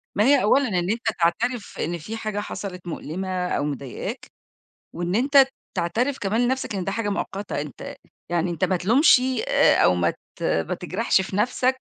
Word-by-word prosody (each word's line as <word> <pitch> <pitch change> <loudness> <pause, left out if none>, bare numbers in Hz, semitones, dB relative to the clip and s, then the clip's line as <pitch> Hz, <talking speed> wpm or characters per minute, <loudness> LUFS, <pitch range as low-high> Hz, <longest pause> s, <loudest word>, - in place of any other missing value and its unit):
ما 205 - +3
هي 275 +1 +5
أولًا 265 +5 +4
إن 180 -2 -1
أنت 230 +1 -2
تعترف 225 +7 0
إن 175 +2 -2
في 215 +8 -6
حاجة 215 -2 -3
حصلت 190 -3 -6
مؤلمة 180 +3 -3
أو 145 - -1
مضايقاك، 140 -3 -5 0.7
وإن 175 +2 -3
أنت 275 +3 +5 0.3
تعترف 230 +10 0
كمان 210 +4 0
لنَفْسك 255 -2 0
إن 190 -2 -2
ده 195 - -2
حاجة 225 -1 -2
مؤقتة، 200 -2 -3
أنت 145 -3 -7 0.3
يعني 175 0 0
أنت 170 -3 -1
ما 185 - +1
تلومش 240 - +5
ي 255 -2 -1
آآ، - - +4
أو 90 - +5
ما 85 -1 +2 0.3
ت - - -10
ما 80 -1 0
تجرحش 190 +3 0
في 190 0 -4
نَفْسك 250 +4 +1
200 Hz, 180 wpm, -24 LUFS, 175-240 Hz, 0.7 s, هي